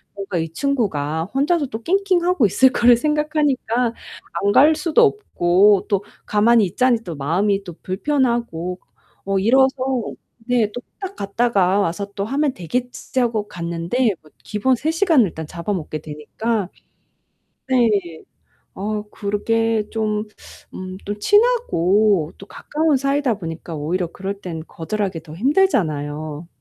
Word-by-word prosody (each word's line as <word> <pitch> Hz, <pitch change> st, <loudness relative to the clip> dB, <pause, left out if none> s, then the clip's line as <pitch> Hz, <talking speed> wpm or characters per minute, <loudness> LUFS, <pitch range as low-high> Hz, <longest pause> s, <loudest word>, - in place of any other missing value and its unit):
뭔가 195 Hz, -2 st, -4 dB
이 160 Hz, -, -2 dB
친구가 165 Hz, -, -1 dB
혼자서 295 Hz, +1 st, +2 dB
또 225 Hz, -1 st, -7 dB
낑낑하고 360 Hz, -, +2 dB
있을 260 Hz, +7 st, +5 dB
거를 240 Hz, -2 st, +5 dB
생각하니까 290 Hz, -5 st, 0 dB, 0.5 s
안 200 Hz, -, +3 dB
갈 305 Hz, +3 st, +6 dB
수도 330 Hz, +8 st, +3 dB
없고 200 Hz, -, +3 dB
또 200 Hz, -1 st, +1 dB, 0.2 s
가만히 215 Hz, +1 st, +4 dB
있자니 240 Hz, +6 st, +2 dB
또 170 Hz, -, -6 dB
마음이 195 Hz, +8 st, 0 dB
또 175 Hz, -, -7 dB
불편하고 225 Hz, -, -1 dB, 0.5 s
어 195 Hz, 0 st, 0 dB
이래서 265 Hz, +7 st, +5 dB, 0.8 s
네 235 Hz, -4 st, +2 dB
또 245 Hz, -, -5 dB, 0.2 s
'딱 390 Hz, -1 st, -6 dB
갔다가 200 Hz, -2 st, +1 dB
와서 200 Hz, +2 st, -2 dB
또 200 Hz, -, -2 dB
하면 275 Hz, +4 st, 0 dB
되겠지.' 245 Hz, +8 st, -3 dB
하고 225 Hz, -3 st, 0 dB
갔는데 170 Hz, +8 st, -1 dB
뭐 155 Hz, -, -20 dB
기본 255 Hz, +5 st, +1 dB
3 305 Hz, +6 st, -1 dB
시간을 325 Hz, -, +3 dB
일단 160 Hz, -2 st, -7 dB
잡아먹게 170 Hz, -2 st, -4 dB
되니까 180 Hz, +8 st, -3 dB, 1.0 s
네. 205 Hz, -10 st, +1 dB, 0.5 s
어 210 Hz, +2 st, -3 dB
그르게 220 Hz, +1 st, 0 dB
좀 215 Hz, -1 st, -1 dB, 0.5 s
음 185 Hz, 0 st, -7 dB
또 205 Hz, +1 st, -3 dB
친하고 210 Hz, -, +3 dB
또 195 Hz, -, -10 dB
가까운 305 Hz, +6 st, 0 dB
사이다 275 Hz, -2 st, +1 dB
보니까 165 Hz, -1 st, -6 dB
오히려 170 Hz, +4 st, -2 dB
그럴 195 Hz, +1 st, -5 dB
땐 165 Hz, -4 st, -6 dB
거절하기 190 Hz, 0 st, -3 dB
더 155 Hz, -2 st, -11 dB
힘들잖아요. 155 Hz, -, 0 dB
210 Hz, 270 characters per minute, -20 LUFS, 180-260 Hz, 1.0 s, 갈